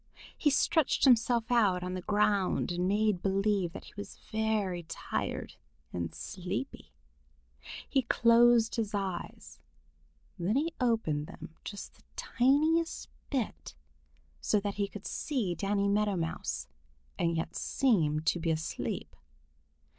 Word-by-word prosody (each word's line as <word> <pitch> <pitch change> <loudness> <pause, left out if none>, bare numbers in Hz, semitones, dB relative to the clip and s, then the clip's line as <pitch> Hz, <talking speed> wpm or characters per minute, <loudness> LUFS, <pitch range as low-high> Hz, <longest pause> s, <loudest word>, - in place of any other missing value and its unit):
He 300 - +2
stretched 315 +1 +2
himself 240 -2 +4
out 200 -7 +3
on 180 0 -3
the 185 - -3
ground 205 -2 +1
and 175 +1 0
made 205 -2 +2
believe 195 -2 +1
that - - -8
he - - -14
was 205 - -8
very 215 -5 0
tired 160 - -4 0.4
and 85 -2 -3
sleepy. 190 +8 -5 1.0
He 270 - +2
closed 235 -1 +5
his 215 -2 -1
eyes. 190 -3 -5 0.8
Then 185 +6 0
he 315 +4 +1
opened 220 - +1
them - - -10
just 205 - -7
the - - -24
tiniest 310 +6 +2 0.2
bit, 260 -6 -3 0.6
so 210 - +2
that 200 0 -3
he 200 0 -1
could 205 0 -10
see 240 - -1
Danny 200 +3 0
Meadow 205 0 +2
Mouse 65 - -3 0.5
and 170 -1 +1
yet 165 - -3
seem 160 - +2
to 165 +2 +1
be 165 0 -1
asleep. 160 0 -3
205 Hz, 130 wpm, -31 LUFS, 180-235 Hz, 1.0 s, closed